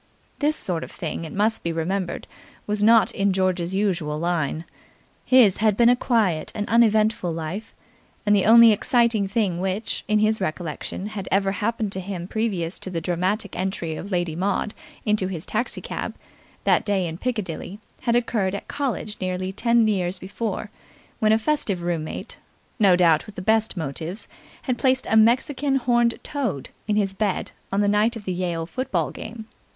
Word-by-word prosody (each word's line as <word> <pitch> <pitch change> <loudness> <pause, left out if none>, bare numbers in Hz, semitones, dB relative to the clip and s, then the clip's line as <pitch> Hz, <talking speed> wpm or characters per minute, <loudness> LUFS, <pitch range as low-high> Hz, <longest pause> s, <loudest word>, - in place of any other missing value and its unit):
This 300 +1 +2
sort 175 - -1
of - - -8
thing, 165 0 -5
it 160 - -8
must 215 +3 +1
be 170 - -2
remembered, 175 +3 -2 0.4
was 210 0 -1
not 225 +1 +5
in 195 0 +1
George's 185 -1 0
usual 175 -7 0
line. 165 -1 -1 0.6
His 245 -7 +6
had 215 -2 +2
been 235 0 +6
a 245 - +6
quiet 215 -11 +1
and 210 -1 -2
uneventful 220 -4 +3
life, 165 +6 -5 0.5
and 205 0 +4
the 195 - +2
only 230 0 +9
exciting 225 -1 +2
thing 195 -4 0
which, 190 +3 -2
in 215 - +3
his 215 0 +2
recollection, 175 +2 -4
had 205 -3 -6
ever 195 0 +2
happened 210 +2 -2
to 190 - -3
him 180 -2 -5
previous 195 -6 -2
to - - -5
the 175 -3 -2
dramatic 185 +5 -1
entry 180 -4 -2
of 200 +6 -7
Lady 175 -3 -1
Maud 200 +4 -1 0.3
into 210 -3 +1
his 175 -3 -5
taxi 235 +4 -2
cab - - -5 0.5
that - - +3
day 195 -3 0
in 165 0 -5
Piccadilly, 205 -6 -4 0.2
had 235 -2 +1
occurred 215 -5 0
at - - -7
college 260 -7 -3
nearly 185 0 -2
ten 235 +1 +3
years 185 -3 0
before, 205 +4 -4 0.5
when 215 0 +3
a 220 - +5
festive 220 -8 -1
room 170 -2 -1
mate - - -7 0.4
no 195 -4 +6
doubt 165 -4 +3
with 210 - -11
the - - -5
best 220 0 +2
motives 160 +6 -4 0.4
had 250 -3 -2
placed 260 0 +2
a - - +4
Mexican 255 +5 +3
horned 240 -2 +2
toad 245 - -3 0.2
in 210 - +1
his 200 -2 +1
bed 200 -1 -1 0.2
on 195 +1 +1
the 205 - +2
night 210 +3 +2
of 215 -3 -8
the 185 - -1
Yale 175 -2 -2
football 175 - -2
game. 220 0 -8
200 Hz, 175 wpm, -23 LUFS, 180-225 Hz, 0.6 s, only